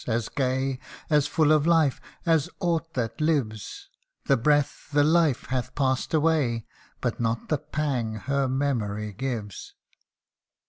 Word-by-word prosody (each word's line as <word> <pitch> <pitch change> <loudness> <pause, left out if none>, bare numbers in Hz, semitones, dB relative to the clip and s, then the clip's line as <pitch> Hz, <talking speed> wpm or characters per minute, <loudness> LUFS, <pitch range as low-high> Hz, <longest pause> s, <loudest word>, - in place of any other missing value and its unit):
as 115 -1 -1
gay, 130 -1 -1 0.3
As 150 -1 +4
full 155 0 +3
of 155 0 +4
life, 160 -5 +3 0.2
as 160 -4 +2
aught 165 -3 -1
that 115 0 -2
lives; 150 - -1 0.4
The 135 - +4
breath 145 +4 +1
the 145 0 +4
life 155 -3 +3
hath 130 0 -2
passed 130 -2 0
away, 145 -8 +1 0.4
But - - -2
not 115 -1 -1
the 150 - +1
pang 135 -7 -2
her 135 +4 -1
memory 110 -6 -1
gives. 110 -4 -5
135 Hz, 135 wpm, -26 LUFS, 120-150 Hz, 0.4 s, As